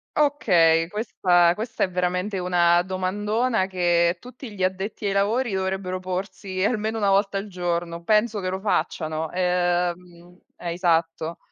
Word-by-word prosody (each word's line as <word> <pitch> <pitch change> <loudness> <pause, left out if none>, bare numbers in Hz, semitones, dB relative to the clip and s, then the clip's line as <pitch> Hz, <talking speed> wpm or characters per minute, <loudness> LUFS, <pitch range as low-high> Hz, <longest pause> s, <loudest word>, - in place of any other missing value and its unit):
Okay, 175 - +3
questa 175 -5 +2
questa 225 +3 -3
è - - -8
veramente 180 +2 -1
una 175 -1 +3
domandona 205 +4 0
che 175 -2 +1
tutti 250 0 -10
gli 190 - -8
addetti 190 +3 -2
ai - - 0
lavori 210 +3 +1
dovrebbero 190 -1 -2
porsi 185 +1 -4
almeno 220 +1 0
1 200 -2 +2
volta 195 0 +2
al 200 - -7
giorno, 175 -2 -3
penso 215 +2 +2
che 185 -1 -2
lo 190 +1 -3
facciano. 160 -6 -2
Ehm, 180 -1 -1 0.2
eh, 170 -1 -4
esatto. 165 -1 0
185 Hz, 140 wpm, -24 LUFS, 175-205 Hz, 0.2 s, Okay